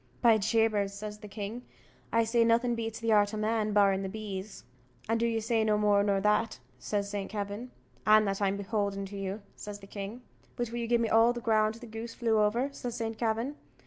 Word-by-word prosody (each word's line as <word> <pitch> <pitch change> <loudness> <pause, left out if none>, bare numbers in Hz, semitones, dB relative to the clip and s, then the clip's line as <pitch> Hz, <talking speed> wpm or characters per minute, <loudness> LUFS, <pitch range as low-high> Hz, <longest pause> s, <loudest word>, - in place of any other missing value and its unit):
"By 225 -2 +6
Jabers," 210 -2 +1
says 210 +1 -6
the 210 - -9
king, 210 +3 -5 0.5
"I 230 0 +4
say 230 +1 +3
nothing 235 +1 +3
beats 225 -1 -3
the 230 -1 0
art 205 0 +3
o' - - -3
man, 215 0 0
barring 200 -2 +4
the 195 - -3
bees." 205 - -6 0.4
"And 225 +1 +1
do 235 - +2
you 225 -1 0
say 225 0 +1
no 215 -1 +2
more 205 -1 +4
nor 200 -1 +2
that?" 210 +3 +1 0.2
says 205 -1 -2
Saint 200 -1 -4
Kavin. 205 +4 -4 0.3
"And 215 0 +5
that 195 +1 -2
I'm 200 0 +1
beholden 200 -1 -2
to 200 +1 -9
you," 195 +1 -4
says 205 -1 -7
the 200 - -13
king. 200 +5 -7 0.3
"But 240 -2 -3
will 240 - -3
you 235 - -2
gi'e 240 0 +4
me 230 -1 0
all 225 +2 +5
the 240 - -5
ground 220 -1 +2
the 230 - -10
goose 225 +1 -7
flew 225 -3 +2
over?" 230 +6 +2
says 245 -3 -5
Saint 225 -1 -4
Kavin. 230 +4 0
215 Hz, 220 wpm, -30 LUFS, 205-230 Hz, 0.5 s, By